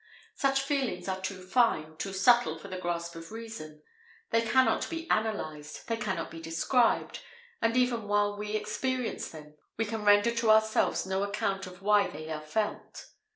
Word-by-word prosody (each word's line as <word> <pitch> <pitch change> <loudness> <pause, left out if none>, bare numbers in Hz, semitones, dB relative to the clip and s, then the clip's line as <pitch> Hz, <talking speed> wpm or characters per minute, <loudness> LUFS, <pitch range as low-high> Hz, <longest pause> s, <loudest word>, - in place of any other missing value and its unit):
Such 270 -1 +1
feelings 270 -10 -1
are 190 0 -2
too 190 -1 -5
fine, 185 -8 +2
too 195 +5 -4
subtle 195 -3 +4
for 200 - -10
the 185 -1 -5
grasp 170 -1 -3
of 165 +2 -9
reason; 220 -10 -8 0.5
they 230 - +4
cannot 255 +3 +2
be 330 0 -5
analyzed; 155 -9 -2
they 230 - 0
cannot 190 -6 -3
be 165 - -8
described; 170 +9 +1 0.4
and 230 +2 +2
even 245 -4 +1
while 205 0 +2
we 210 +1 -4
experience 250 +4 -2
them, 150 -1 -12 0.2
we 225 - +1
can 220 0 -4
render 205 +2 +5
to 230 -1 0
ourselves 220 -2 +3
no 190 0 -1
account 200 -1 -1
of 180 +1 -12
why 210 0 +4
they 155 +2 -8
are 155 -1 -3
felt. 205 +8 -4
205 Hz, 170 wpm, -29 LUFS, 170-230 Hz, 0.5 s, render